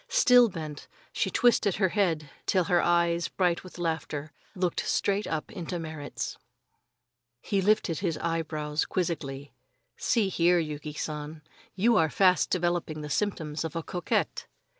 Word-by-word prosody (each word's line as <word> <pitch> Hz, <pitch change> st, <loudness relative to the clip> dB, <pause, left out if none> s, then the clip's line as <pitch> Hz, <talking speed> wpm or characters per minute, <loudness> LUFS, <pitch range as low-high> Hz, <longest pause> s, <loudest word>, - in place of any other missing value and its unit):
Still 250 Hz, -, +6 dB
bent, 155 Hz, -5 st, -7 dB, 0.3 s
she -, -, 0 dB
twisted 230 Hz, -6 st, +3 dB
her 190 Hz, -2 st, +2 dB
head 170 Hz, -7 st, 0 dB, 0.2 s
till 185 Hz, -2 st, +3 dB
her 175 Hz, +1 st, +2 dB
eyes, 170 Hz, 0 st, +2 dB
bright 180 Hz, -2 st, 0 dB
with 185 Hz, -, -12 dB
laughter, 160 Hz, -3 st, -3 dB, 0.2 s
looked 180 Hz, -2 st, 0 dB
straight 200 Hz, +1 st, 0 dB, 0.2 s
into 175 Hz, 0 st, -5 dB
Merrit's. 155 Hz, -3 st, -5 dB, 1.0 s
He 195 Hz, -, 0 dB
lifted 190 Hz, -5 st, +2 dB
his 170 Hz, -5 st, -1 dB
eyebrows 155 Hz, -2 st, -1 dB
quizzically. 145 Hz, -6 st, -3 dB, 0.4 s
"See 220 Hz, -5 st, +1 dB
here, 175 Hz, -1 st, +3 dB
Yuki 150 Hz, -2 st, -3 dB
San, 150 Hz, 0 st, -5 dB, 0.3 s
you 220 Hz, +4 st, +3 dB
are 160 Hz, -1 st, +3 dB
fast 185 Hz, +2 st, +3 dB
developing 175 Hz, -3 st, -1 dB
the 150 Hz, 0 st, -6 dB
symptoms 160 Hz, -7 st, -1 dB
of 160 Hz, -1 st, -5 dB
a 165 Hz, -, -2 dB
coquette." 180 Hz, +1 st, -2 dB
170 Hz, 140 wpm, -28 LUFS, 155-185 Hz, 1.0 s, Still